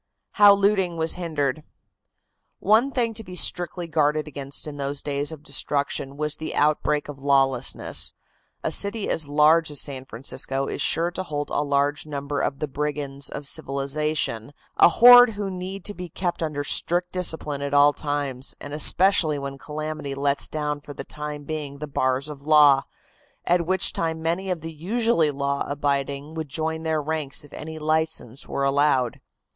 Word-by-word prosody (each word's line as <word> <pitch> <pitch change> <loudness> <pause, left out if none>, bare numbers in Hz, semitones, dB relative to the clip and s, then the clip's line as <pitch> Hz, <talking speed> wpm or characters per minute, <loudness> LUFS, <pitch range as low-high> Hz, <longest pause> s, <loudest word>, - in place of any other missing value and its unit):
HOW 205 -1 +7
LOOTING 195 -4 +1
WAS 160 0 +2
HINDERED. 155 -5 -2 1.0
One 220 +7 +3
thing 240 -4 -1
to 220 +1 -4
be 185 -3 -10
strictly 175 0 +1
guarded 155 -1 0
against 140 -1 -5
in 150 -1 -7
those 140 0 -2
days 145 +1 -2
of 155 -2 -10
destruction 140 -1 0
was 150 0 -1
the 155 - -5
outbreak 150 0 +1
of 145 -2 -9
lawlessness. 135 -3 +1 0.5
A - - -1
city 200 +1 +2
as 155 -3 +1
large 155 +3 +4
as 145 - -1
San 130 -2 -3
Francisco 135 +2 -2
is - - -4
sure 170 +1 +1
to 180 - -4
hold 145 -5 -4
a - - 0
large 145 +1 0
number 140 -1 -4
of 135 - -1
the 150 - -3
brigands 145 -1 -4
of 145 - -7
civilization, 140 -3 -2 0.2
a - - +7
horde 245 +5 +8
who 205 -1 -4
need 185 +1 -6
to 205 - -1
be 180 -2 -8
kept 175 +1 -3
under 150 -3 -2
strict 175 +4 +1
discipline 160 -5 -2
at 140 0 -2
all 145 +1 +6
times, 145 -3 -3
and 145 - -8
especially 160 0 +4
when 140 -1 -6
calamity 150 -1 -5
lets 140 0 0
down 150 -1 -3
for 145 0 -11
the - - -6
time 150 -1 -7
being 145 -2 -5
the 150 - -5
bars 130 -1 -1
of 150 -2 -8
the 145 +2 -11
law, 145 -3 +7 0.6
at 170 -1 +1
which 190 0 +1
time 160 -1 -2
many 170 +4 -2
of 180 -3 -2
the 165 +1 -7
usually 190 0 +1
law 140 0 -2
abiding 140 +1 -2
would 160 -2 -5
join 160 +3 -3
their 160 -1 -1
ranks 155 -1 -1
if 145 - -16
any 160 +1 -7
license 155 -5 -2
were 140 - -2
allowed. 135 -3 +1
150 Hz, 175 wpm, -24 LUFS, 140-165 Hz, 1.0 s, horde